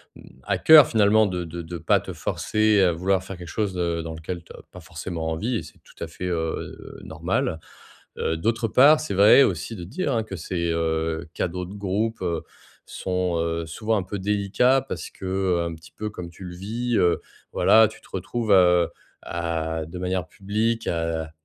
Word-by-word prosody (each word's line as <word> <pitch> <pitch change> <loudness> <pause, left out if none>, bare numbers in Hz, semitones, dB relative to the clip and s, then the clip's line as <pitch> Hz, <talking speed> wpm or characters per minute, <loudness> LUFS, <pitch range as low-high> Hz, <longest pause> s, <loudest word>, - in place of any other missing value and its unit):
mmh, - - -14 0.2
à - - 0
cœur, 155 -4 +9
finalement, 110 0 +4
de 90 -2 -3
de 85 +1 -6
de 85 +1 -7
pas 80 - +2
te - - -7
forcer 110 -2 +1
à 90 - +4
vouloir 95 +3 0
faire 95 -1 -8
quelque 90 -1 -9
chose 100 +1 -2
de 85 -2 -1
dans 80 0 -6
lequel 85 +2 -6
tu - - -17
as - - -12
pas - - -11
forcément 80 -3 -5
envie 110 +10 -2
et - - -2
c'est - - -15
tout - - -11
à 85 - -4
fait, 85 +2 -7
heu, 80 -2 -4
normal. 80 - -2 0.6
Heu, 80 - -1
d'autre 115 +6 0
part, 145 +7 +6
c'est 155 - -4
vrai 105 +8 +7
aussi 115 - -2
de 85 - -7
dire, 140 - -2
hein, 115 -2 +1
que 100 -3 -7
ces, 85 0 -3
heu, 80 0 -1
cadeaux 90 +1 -2
de 95 - -10
groupe, 105 +3 -2
heu, 85 -2 -1 0.4
sont, 90 -2 -2
heu, 85 0 -1
souvent 110 +7 -2
un 100 - 0
peu 95 +2 -5
délicats 105 +6 +2
parce 80 - -5
qu'un 95 -3 -1
petit 80 0 -14
peu 105 0 -4
comme 90 -4 -8
tu 85 +3 -13
le 90 - -7
vis, 115 +6 -2
heu, 85 -1 +2 0.3
voilà, 110 0 +6
tu - - -13
te - - -20
retrouves, 110 +4 -2
heu, 90 -3 +5 0.3
à 80 -1 -3
de 85 +3 -9
manière 90 -2 -2
publique, 110 +5 -2
à 80 -1 -2
90 Hz, 200 wpm, -24 LUFS, 85-105 Hz, 0.6 s, cœur